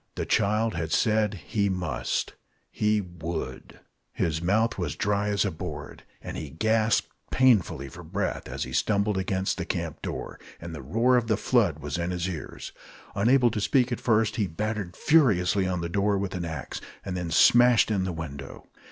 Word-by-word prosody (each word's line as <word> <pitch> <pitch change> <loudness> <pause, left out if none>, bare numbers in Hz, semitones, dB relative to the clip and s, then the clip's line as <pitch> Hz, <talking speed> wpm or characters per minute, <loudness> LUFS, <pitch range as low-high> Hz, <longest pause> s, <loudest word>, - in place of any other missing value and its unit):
The - - -2
child 110 +2 +1
had 80 -2 -3
said 110 -1 +2
he 100 +4 -1
must. 90 -2 -2 0.4
He 105 0 +1
would. 85 -7 -6 0.3
His 80 -1 -1
mouth 105 +5 +1
was 85 -4 -2
dry 100 0 0
as 100 0 +1
a 100 - 0
board, 80 - -7 0.2
and - - -6
he 70 +1 -5
gasped 110 +8 +1 0.2
painfully 110 - +3
for 75 +6 -10
breath, 90 +5 -3
as - - -3
he 65 - -7
stumbled 100 +4 +1
against 95 0 -1
the - - -1
camp - - -4
door; - - -5 0.2
and 85 0 -7
the 75 - -6
roar 115 - +2
of 120 -2 0
the 110 -3 +2
flood 105 - +2
was 75 +1 -4
in 85 +1 -1
his 90 0 -2
ears. 85 -5 -6 0.4
Unable 120 +4 +4
to 105 - -2
speak 125 +2 +2
at 120 - -2
first, 110 0 +2
he 105 -4 +1
battered 105 +1 -3
furiously 100 - +3
on 90 -2 -1
the 85 - -2
door 100 +3 +1
with 95 -1 -3
an 90 -2 -3
axe, 80 -4 -5 0.2
and 95 - -3
then 90 -2 -3
smashed 120 +8 +5
in 100 -3 +1
the 95 - -2
window. 70 -4 -8
100 Hz, 185 wpm, -27 LUFS, 85-110 Hz, 0.4 s, smashed